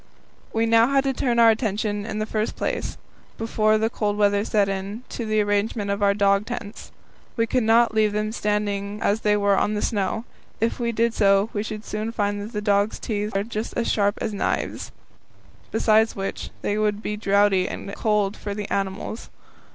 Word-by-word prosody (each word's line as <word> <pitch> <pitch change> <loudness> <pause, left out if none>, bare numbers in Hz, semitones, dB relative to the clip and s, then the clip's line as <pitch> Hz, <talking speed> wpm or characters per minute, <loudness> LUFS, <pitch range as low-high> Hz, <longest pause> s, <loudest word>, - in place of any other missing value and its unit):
We 225 0 +1
now 230 0 +5
had 275 0 +2
to 270 -1 0
turn 245 -2 0
our 230 -1 +7
attention 210 -2 -2
in 215 - -4
the 215 - -1
first 215 0 -2
place, - - -3 0.4
before 215 -1 +2
the 220 +1 +1
cold 210 -2 -2
weather 205 -1 +3
set 210 -2 +2
in, 195 +4 -4
to 235 - -5
the 215 0 +2
arrangement 205 0 0
of 200 +1 -2
our 200 0 +3
dog 200 0 +2
tents. 225 -4 -7 0.5
We 230 - +3
could 250 +2 +1
not 230 +1 +4
leave 215 -1 +3
them 210 +1 -1
standing 205 -1 -2
as 210 +2 +1
they 210 0 +3
were 200 -1 +3
on 210 +2 +1
the 210 - -1
snow; 210 +1 -1 0.3
if 225 +3 0
we 235 -1 0
did 230 0 +1
so, 195 +1 +3
we 205 - -1
should 215 0 -6
soon 215 +2 -3
find 205 -1 -2
that 210 -2 -4
dogs' 205 0 +2
teeth 210 -2 -2
are 200 - 0
just 220 0 -5
as 235 - +1
sharp 205 0 +1
as 220 - -2
knives; 200 - -2 0.8
besides 220 0 +3
which, 195 0 -4
they 205 +1 0
would 210 0 0
be 210 - -2
draughty 200 -2 +2
and 200 - -6
cold 210 -2 +1
for 205 -1 -5
the 205 -1 -4
animals. 195 +3 -3
210 Hz, 195 wpm, -24 LUFS, 205-225 Hz, 0.8 s, our